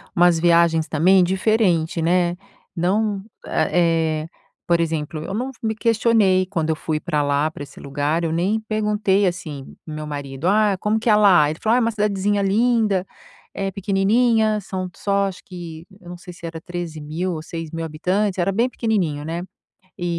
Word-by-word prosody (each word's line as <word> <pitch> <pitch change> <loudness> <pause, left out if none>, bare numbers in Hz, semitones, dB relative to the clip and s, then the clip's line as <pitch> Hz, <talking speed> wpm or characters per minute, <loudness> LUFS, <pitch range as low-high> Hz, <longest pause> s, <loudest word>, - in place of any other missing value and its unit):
umas 175 -1 +4
viagens, 170 -1 +3
também, 180 +4 +4
diferente, 185 -4 +1
né, 175 +1 +2 0.4
não 195 +3 0 0.2
eh 165 -3 +1
eh, 165 - -13 0.4
por 170 -1 +3
exemplo, 155 -1 -2
eu 190 - -5
não 250 +5 -2
me 220 -1 -1
questionei 215 -4 +3
quando 165 -4 -2
eu 160 - +2
fui 155 0 -2
para 150 -3 -1
lá, 145 +2 +1
para 145 - -8
esse 140 - -13
lugar, 145 +4 -1
eu 160 - -1
nem 190 +7 +1
perguntei, 210 -2 +1
assim, 155 -6 -6
para 155 - -8
o 155 - -5
meu 155 0 -5
marido: 145 +1 -4
"Ah, 205 -1 +3
como 215 +1 0
que 230 - -1
é 210 - +6
lá?", 185 -8 +5
Ele 155 - -5
falou: 220 +1 +2
"Ah, - - +4
é - - +4
uma 230 - +1
cidadezinha 205 -1 0
linda, 210 -1 +2 0.5
é 195 0 -2
pequenininha", 215 +3 +2
são 185 -1 -5
só 200 -1 0
acho 190 -2 -8
que 170 -3 -9 0.2
eu 175 - -12
não 175 - -7
sei 180 0 -11
se 170 0 -11
era 165 -1 -6
13 175 -3 -6
mil 170 +5 -3
ou 155 - -5
6 165 -1 -6
mil 165 0 -4
habitantes, 185 +6 -1
era 180 +2 +1
bem 235 +5 +1
pequenininho, 185 -13 -1
né, 165 +2 -3 0.6
é 175 - -4
180 Hz, 190 wpm, -21 LUFS, 160-205 Hz, 0.6 s, é